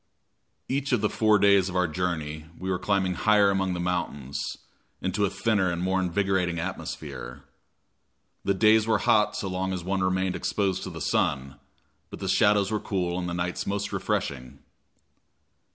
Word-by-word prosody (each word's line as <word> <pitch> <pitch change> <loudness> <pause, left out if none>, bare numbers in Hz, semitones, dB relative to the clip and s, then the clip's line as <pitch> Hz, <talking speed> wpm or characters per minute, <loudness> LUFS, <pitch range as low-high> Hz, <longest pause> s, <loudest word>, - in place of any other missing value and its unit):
Each 140 +1 -1
of 120 - +2
the 105 - +1
four 110 -1 +4
days 100 -1 +4
of 90 - -7
our 90 -1 +2
journey 80 -2 -3
we 95 +1 -3
were 90 - -1
climbing 95 -2 +1
higher 105 +1 +4
among 95 -2 0
the - - -4
mountains, 85 -6 -2 0.6
into 95 +3 0
a - - 0
thinner 100 -3 +1
and 85 - -3
more 95 +1 +1
invigorating 95 -1 0
atmosphere. 70 -7 -6 1.0
The 100 - +1
days 110 +2 +4
were 110 -1 +3
hot 105 -1 +3
so 100 - -3
long 95 0 -2
as 90 -2 -4
one 95 +2 -1
remained 95 0 0
exposed 100 -3 -1
to - - -5
the - - -8
sun, 70 0 0 0.5
but - - -8
the - - -5
shadows 100 0 +3
were 110 - 0
cool 90 -4 -2
and 90 -1 -3
the 85 - -3
nights 90 +1 -3
most 100 0 -2
refreshing. 65 -3 -2
95 Hz, 170 wpm, -26 LUFS, 85-100 Hz, 1.0 s, four